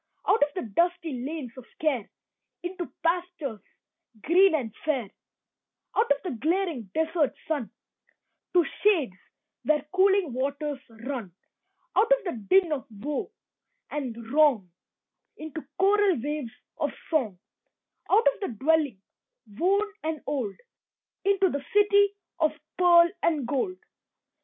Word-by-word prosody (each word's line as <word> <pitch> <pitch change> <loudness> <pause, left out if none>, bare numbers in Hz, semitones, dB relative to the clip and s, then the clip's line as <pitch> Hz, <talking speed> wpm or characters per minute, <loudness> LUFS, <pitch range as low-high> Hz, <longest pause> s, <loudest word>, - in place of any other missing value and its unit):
Out 425 - +4
of 290 - +4
the 365 - -2
dusty 340 -2 +1
lanes 285 -3 -5
of 255 - -10
care 275 -9 0 0.5
Into 355 0 -5
pastures 335 -8 -1 0.6
green 365 +2 +5
and 235 -8 -3
fair. 265 -10 -1 0.8
Out 445 - +2
of 285 - +5
the 360 - -3
glaring 325 - 0
desert 320 -2 +1
sun 290 -8 -1 0.8
To 350 -2 +5 0.2
shades 335 - +3 0.5
where 300 -2 +2
cooling 380 -5 +3
waters 280 +2 -2
run. 230 -3 -6 0.6
Out 455 +3 +3
of - - +4
the 360 - -2 0.2
din 375 -4 +5
of 280 -2 -2
woe 250 +8 -4 0.6
and 265 -6 -3 0.2
wrong 275 - +4 0.7
Into 315 0 -7
choral 390 -3 +4
waves 290 -2 -3 0.3
of - - +1 0.2
song 240 - +1 0.7
Out 435 +4 +5
of - - -17
the 395 - -2
dwelling, 295 -5 +2 0.6
worn 395 - +2
and 315 -1 -3
old, 255 -9 -2 0.7
Into 390 -1 +4
the 285 -1 -3
city 405 -1 +5 0.2
of 310 -2 +3 0.2
pearl 345 -1 +7
and 305 -6 +1
gold. 295 +8 -1
315 Hz, 125 wpm, -27 LUFS, 270-365 Hz, 0.8 s, pearl